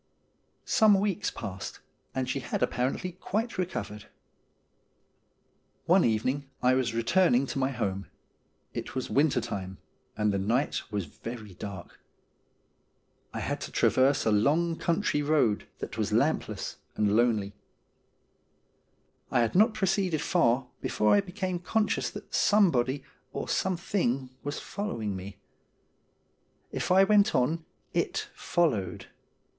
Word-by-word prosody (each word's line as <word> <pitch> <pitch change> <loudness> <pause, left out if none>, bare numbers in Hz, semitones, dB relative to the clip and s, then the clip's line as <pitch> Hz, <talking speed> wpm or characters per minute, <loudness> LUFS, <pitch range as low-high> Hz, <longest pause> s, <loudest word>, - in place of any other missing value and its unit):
Some 210 -3 +5
weeks 200 0 0
passed, 95 0 -6 0.4
and 130 -1 -1
she 135 - -1
had 125 - -2
apparently 130 +9 -1
quite 205 +4 -3
recovered. 105 - -4 1.8
One 180 +2 +5
evening 130 +5 0
I 125 0 +3
was 130 -3 0
returning 125 +2 +3
to 135 - -3
my 130 0 +1
home. 100 -7 -3 0.7
It - - -5
was 130 - -3
winter 140 -2 +3
time, 95 -5 -5 0.4
and 105 -1 +2
the 100 - 0
night 115 +9 -1
was 100 -3 -2
very 110 +6 -8
dark. 95 -1 -8 1.3
I - - -4
had - - -3
to - - -6
traverse 135 +2 +3
a 110 - +3
long 155 +11 +2
country 165 -2 0
road 145 -8 +2
that - - -6
was - - 0
lampless - - 0 0.2
and 105 -1 +2
lonely. 110 -4 +2 1.8
I 120 - +3
had 115 - +1
not 215 +4 +4
proceeded 190 -5 +1
far 130 -7 +2 0.2
before 105 - +2
I 205 - +5
became 185 -2 -3
conscious 210 +3 0
that - - -10
somebody 145 - +3 0.3
or - - -4
something 170 -8 0
was 145 +1 -4
following 115 - -4
me. 95 +1 -8 1.3
If - - -2
I 190 +1 +7
went 205 0 +4
on, 155 +6 +1 0.3
it - - -1
followed. 150 - 0
135 Hz, 125 wpm, -28 LUFS, 110-180 Hz, 1.8 s, I